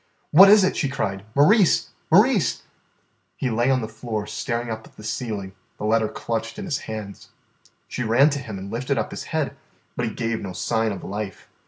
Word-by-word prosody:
"What 195 +5 +9
is 210 -1 +7
it?" 185 - +1
she 140 - 0
cried. 100 -8 -3
"Maurice! 185 +7 +4 0.2
Maurice!" 205 - +4 0.7
He 130 - -1
lay 120 +3 +1
on 130 -1 +2
the 110 - -4
floor 110 -1 -4
staring 120 +1 -3
up 110 0 -6
at - - -23
the 105 - -11
ceiling, 110 -3 -4 0.3
the - - -5
letter 110 0 +2
clutched 115 - -4
in 205 - -5
his 160 -7 -1
hands. 105 -2 -7 0.6
She - - -5
ran 125 +6 +4
to 145 - -2
him 110 -7 -7
and 95 +1 -7
lifted 125 +4 -1
up 110 - -2
his - - -6
head, - - -2 0.4
but - - -1
he - - -3
gave 115 -1 -2
no 95 -2 -6
sign 110 +3 0
of 100 - -6
life. 100 -1 -6
115 Hz, 200 wpm, -23 LUFS, 110-140 Hz, 0.7 s, What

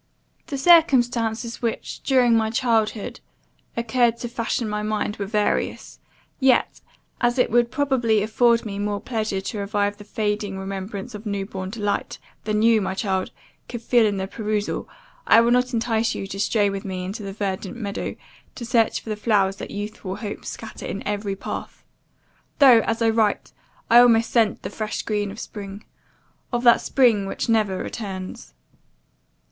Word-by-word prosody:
"The 280 - -3
circumstances 245 -8 +3
which, 230 -2 -3
during 250 -3 +4
my 220 -1 +2
childhood, 225 -3 0 0.6
occurred 235 0 +2
to 240 - -3
fashion 230 0 -2
my 210 0 -2
mind, 215 0 -2
were 200 - -3
various; 210 0 -1 0.4
yet, 265 -2 +2 0.4
as 240 +1 +1
it 250 - +2
would 240 0 +3
probably 240 -7 +1
afford 230 +2 +3
me 200 -2 -5
more 205 0 -1
pleasure 215 -5 -2
to 205 +2 -5
revive 205 0 -1
the 205 - -11
fading 205 -1 -2
remembrance 195 +3 -5
of 210 +1 -7
newborn 195 -2 -4
delight, 205 -1 -2 0.3
than 215 0 +1
you, 225 -1 +5
my 190 -1 -2
child, 190 -2 -1 0.4
could 240 -1 -6
feel 235 -2 +4
in 200 -1 -1
the 190 - -2
perusal, 210 0 -3 0.4
I 230 - +7
will 235 +1 +3
not 250 +1 +2
entice 230 -1 0
you - - -4
to 195 0 -7
stray 205 0 +2
with 195 -1 -3
me 185 -2 -4
into 200 +4 -5
the 195 -1 -5
verdant 195 +2 -4
meadow, 205 -4 -4 0.4
to 235 - -6
search 230 -1 +2
for - - -10
the - - -1
flowers 205 -3 +1
that - - -7
youthful 205 -2 -5
hopes 210 -2 -6
scatter 225 - -8
in 200 - -5
every 205 -1 -2
path; - - -7 0.7
though, 260 -6 +8
as 230 0 0
I 225 - +4
write, 220 -2 +1 0.4
I 235 - +7
almost 230 -2 +5
scent 225 -4 +2
the - - -5
fresh 215 -1 -4
green 210 -2 -1
of 205 +3 -8
spring 200 -3 -8 0.7
of 240 -1 -1
that 235 -1 +6
spring 230 -7 +3
which - - -3
never 215 -5 +2
returns! 185 - -6
215 Hz, 165 wpm, -23 LUFS, 200-235 Hz, 0.7 s, though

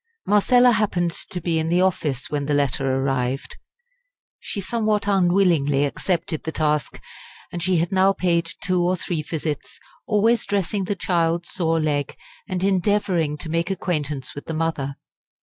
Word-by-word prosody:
Marcella 245 +4 +5
happened 195 -6 +1 0.2
to 180 - -4
be 165 -1 0
in 160 0 -1
the 175 +2 +3
office 150 -8 0
when 145 -1 -2
the 145 - +1
letter 135 -1 +1
arrived. 135 -1 -1 0.8
She - - -5
somewhat 215 0 0
unwillingly 175 -7 +3
accepted 170 +3 -2
the 160 - -3
task, 150 -5 -1 0.5
and 175 - -4
she 185 0 +2
had 165 +1 0
now 190 0 +4
paid 170 -3 0
two 185 -2 +1
or 180 +1 +2
three 170 -3 -2
visits, 155 -1 -4 0.3
always 225 +1 +3
dressing 200 0 -1
the 205 - -1
child's 170 -2 0
sore 165 -3 +1
leg, 145 -3 -1 0.3
and 185 -1 -2
endeavouring 190 -5 +1
to 160 - -7
make 165 +3 0
acquaintance 150 -7 -2
with 145 - -8
the 160 - -3
mother. 155 -4 -2
170 Hz, 155 wpm, -23 LUFS, 150-190 Hz, 0.8 s, Marcella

